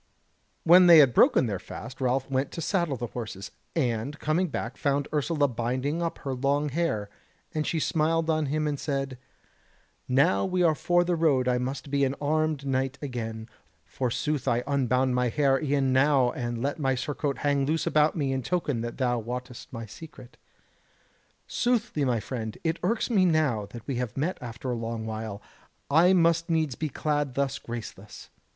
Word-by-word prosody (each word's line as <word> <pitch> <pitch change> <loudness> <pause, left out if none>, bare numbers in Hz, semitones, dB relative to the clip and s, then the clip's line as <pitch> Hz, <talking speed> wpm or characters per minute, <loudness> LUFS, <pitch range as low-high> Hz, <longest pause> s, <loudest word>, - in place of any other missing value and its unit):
When 180 +2 +7
they 170 -1 +9
had 135 -5 +7
broken - - +5
their 100 -5 -2
fast 120 +7 -9
Ralph 130 +1 +1
went 135 0 -1
to - - -5
saddle 170 -5 0
the 120 - -3
horses, 105 -5 -6 0.2
and 125 -1 -1
coming 160 +5 0
back 125 -5 -4
found 140 0 0
Ursula 150 0 +1
binding 130 +6 -2
up 165 -1 -2
her 135 - -1
long 140 +3 0
hair, 140 -9 -1 0.5
and 155 -1 -1
she 165 - -1
smiled 160 +1 +1
on 155 -2 +1
him 155 +2 -1
and 145 -2 -2
said: 135 -3 -3 0.9
"Now 140 +8 +3
we 185 -1 +1
are 165 -2 +4
for 175 +3 +2
the 175 0 0
road 145 -6 +2
I 125 0 +2
must 135 +2 -4
be 140 -1 +2
an 135 0 +1
armed 155 -1 0
knight 135 0 -1
again: 115 -5 -5 0.4
forsooth 135 +2 -2
I 120 -1 +2
unbound 130 -2 +1
my 125 0 +1
hair 135 +1 +2
e'en 140 -3 +1
now 130 -2 +4
and 120 -1 -4
let 145 +4 -2
my 135 -2 +1
surcoat 140 +1 -2
hang 140 -2 +1
loose 160 +2 0
about 155 0 +3
me 140 -5 -1
in 130 - -1
token 145 -4 -1
that 120 0 -5
thou 125 -2 +1
wottest 125 +3 -7
my 115 -3 -6
secret. 130 +1 -12 1.1
Soothly, 240 - 0
my 120 -3 +1
friend, 110 -2 -5
it 165 0 -1
irks 230 +2 0
me 200 -5 +4
that - - +3
now 135 -10 +1 0.2
we 130 -2 -3
have 125 -2 -4
met 160 +7 -1
after 120 +1 -5
a - - -1
long 115 -1 -4
while, 110 -2 -5 0.5
I 170 +5 +6
must 170 -1 +3
needs 160 -4 +1
be 155 +4 -3
clad 145 -1 -1
thus 140 0 -1
graceless. 110 -3 -9
140 Hz, 180 wpm, -27 LUFS, 125-155 Hz, 1.1 s, they